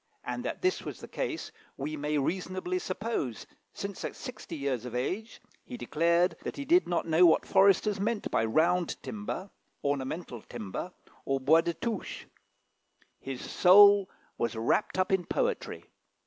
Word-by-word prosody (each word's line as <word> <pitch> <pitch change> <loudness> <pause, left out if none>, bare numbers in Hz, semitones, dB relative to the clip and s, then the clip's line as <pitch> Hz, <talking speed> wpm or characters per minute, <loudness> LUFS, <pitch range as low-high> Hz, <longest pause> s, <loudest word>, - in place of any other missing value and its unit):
And - - -4
that - - -4
this 370 +1 +2
was - - -7
the - - -9
case - - -4 0.3
we 150 +3 -3
may 150 0 -1
reasonably 185 +4 -2
suppose, 185 - -3 0.3
since 200 -1 -6
at - - -4
sixty 245 -9 -8
years 140 -5 -2
of 125 -1 -6
age 195 - -3 0.2
he 245 - -8
declared 170 -1 +2
that - - -5
he 280 - -4
did 345 +5 +4
not 175 - 0
know 165 +2 +4
what 160 - +3
foresters 195 +1 +4
meant 215 +1 -1
by - - +2
round 170 +9 +2
timber, 205 -2 -5 0.3
ornamental 140 -2 -3
timber, 115 - -6 0.3
or 135 0 0
bois 155 +5 +5
de 170 0 -2
touche. 230 -4 -4 0.9
His 135 -2 -6
soul 200 +1 +7 0.3
was 115 -1 -1
wrapped 115 - 0
up 185 0 +1
in 190 -2 +2
poetry. 485 - -2
180 Hz, 155 wpm, -29 LUFS, 140-200 Hz, 0.9 s, soul